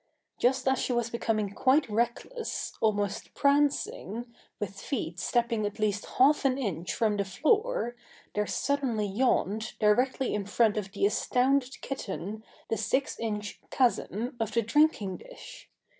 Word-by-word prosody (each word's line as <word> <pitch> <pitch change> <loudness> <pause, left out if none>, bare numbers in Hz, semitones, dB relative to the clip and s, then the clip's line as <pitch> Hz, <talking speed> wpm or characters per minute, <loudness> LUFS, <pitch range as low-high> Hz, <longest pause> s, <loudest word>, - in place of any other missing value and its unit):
Just 260 +1 +2
as 265 0 +3
she 250 - 0
was 240 -1 0
becoming 215 -3 -1
quite 270 +6 +3
reckless, 235 - -2
almost 205 -2 0
prancing, 280 -5 +1 0.3
with 195 -1 -5
feet 180 - -3
stepping 235 -1 +1
at 205 0 -3
least 210 -1 0
half 290 +4 +5
an 265 -1 +2
inch 185 - -2
from 215 -3 +1
the 200 - +1
floor, 405 - +1 0.4
there 210 0 0
suddenly 265 -6 0
yawned 215 0 0
directly 250 +5 +2
in 200 -2 -2
front 215 +1 +3
of 200 -2 -3
the 395 - +1
astounded 265 -7 +1
kitten 215 -4 -5 0.2
the 225 - -1
six 260 +6 0
inch 210 -2 -4
chasm 240 -1 0
of 225 -1 -2
the 230 - +2
drinking 230 -6 +2
dish! - - -12
230 Hz, 145 wpm, -29 LUFS, 210-265 Hz, 0.4 s, half